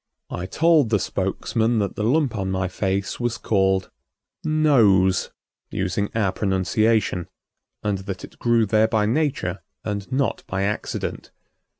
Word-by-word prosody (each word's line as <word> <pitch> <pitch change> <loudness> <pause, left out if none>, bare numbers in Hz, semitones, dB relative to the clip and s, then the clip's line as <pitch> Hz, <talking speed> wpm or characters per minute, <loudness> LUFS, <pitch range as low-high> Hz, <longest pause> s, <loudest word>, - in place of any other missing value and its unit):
I 90 - -4
told 155 - +3
the 105 - +3
spokesman 110 +5 -1
that 100 -2 -1
the 105 - -2
lump 130 +1 +2
on 95 -2 -2
my 95 -1 0
face 95 +1 -2
was 120 -1 -1
called 95 -2 +1 0.5
"nose," 115 - +3 0.4
using 95 +2 -1
our 105 -4 +2
pronunciation, 95 0 +1 0.6
and 100 -2 0
that 95 0 -6
it - - -12
grew 120 -2 +3
there 110 +2 +3
by 110 -2 +1
nature 115 - 0 0.2
and 100 +1 -4
not 135 +1 0
by 95 +1 -1
accident. 105 +1 -3
105 Hz, 135 wpm, -23 LUFS, 95-115 Hz, 0.6 s, told